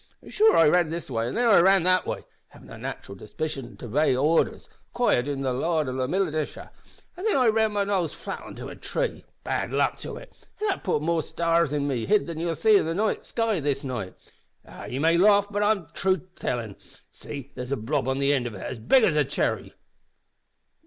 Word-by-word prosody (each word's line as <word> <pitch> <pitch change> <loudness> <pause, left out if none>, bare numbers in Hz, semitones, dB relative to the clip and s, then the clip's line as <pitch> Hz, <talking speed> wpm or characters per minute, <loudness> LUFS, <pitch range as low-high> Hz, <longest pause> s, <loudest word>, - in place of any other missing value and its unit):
an' - - -12
sure 440 +1 +4
I 165 - +6
ran 175 +1 +3
this 165 -3 -5
way 115 -1 -1
an' 125 - -4
then 245 - +1
I 215 - +7
ran 190 0 +5
that 185 +1 +2
way - - -3 0.2
havin' - - -16
a - - -9
nat'ral 100 - -7
disposition 125 +5 -6
to - - -9
obey 130 +4 +2
orders, 150 +6 +1 0.2
acquired 145 - +1
in 140 -1 -3
the 130 -1 0
Louth 155 +4 0 0.2
Militia 160 -5 -2 0.4
an' 360 - -8
then 440 - +2
I 260 -2 +3
ran 220 0 +2
my 205 -1 +1
nose 190 -6 0
flat - - -7
on - - -11
a - - -7
tree - - -3 0.2
bad - - -2
luck - - +1
to - - -7
it! - - -14
that 410 -2 -1
putt 165 -6 0
more 165 0 +1
stars 170 -1 +1
in 145 -1 -1
me 125 -5 -2
hid 210 +1 +3
than 165 -2 -6
you'll 165 0 -1
see 215 +2 +5
in 160 - 0
the 200 +7 0
sky 225 -5 -1
this 140 -2 -1
night. 120 -9 -5 0.5
Ah! - - -10
ye 125 - -5
may 165 +4 +3
laugh, 200 +1 +5
but 205 0 -1
it's 205 -5 +1
truth 185 -3 0
I'm 185 -1 -28
tellin'. 115 -5 -3 0.4
See, 140 -1 -9
there's 125 +1 -7
a 140 - 0
blob 115 +2 -1
on 130 0 0
the 140 +1 +2
ind 125 -4 0
of 115 - -7
it 95 - -8
as 125 - -5
big 255 - +4
as 170 - +3
a 150 - +4
chirry!" 140 - -2
165 Hz, 220 wpm, -25 LUFS, 135-195 Hz, 0.5 s, I